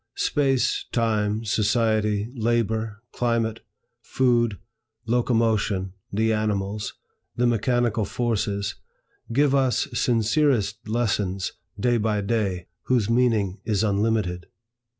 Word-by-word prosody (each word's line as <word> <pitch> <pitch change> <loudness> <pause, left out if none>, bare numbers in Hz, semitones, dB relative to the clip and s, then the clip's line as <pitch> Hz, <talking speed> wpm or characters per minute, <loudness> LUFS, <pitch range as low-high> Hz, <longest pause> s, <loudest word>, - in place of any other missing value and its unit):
Space, 135 -3 +1
time, 110 -1 0
society, 105 0 +1
labor, 115 -2 -1
climate, 115 -2 0 0.4
food, 120 -4 +1 0.5
locomotion, 110 -5 +1 0.2
the 110 +2 +1
animals, 105 -1 -2 0.4
the 120 - +1
mechanical 120 -1 +1
forces, 100 -3 -1 0.6
give 140 +3 +3
us 135 -3 +2
sincerest 115 -2 +1
lessons, 100 -5 0 0.3
day 120 -1 +2
by 105 -1 0
day, 100 -4 -1 0.2
whose 115 -4 +1
meaning 115 -5 +2
is 105 -2 0
unlimited. 100 -4 0
110 Hz, 90 wpm, -24 LUFS, 105-120 Hz, 0.6 s, give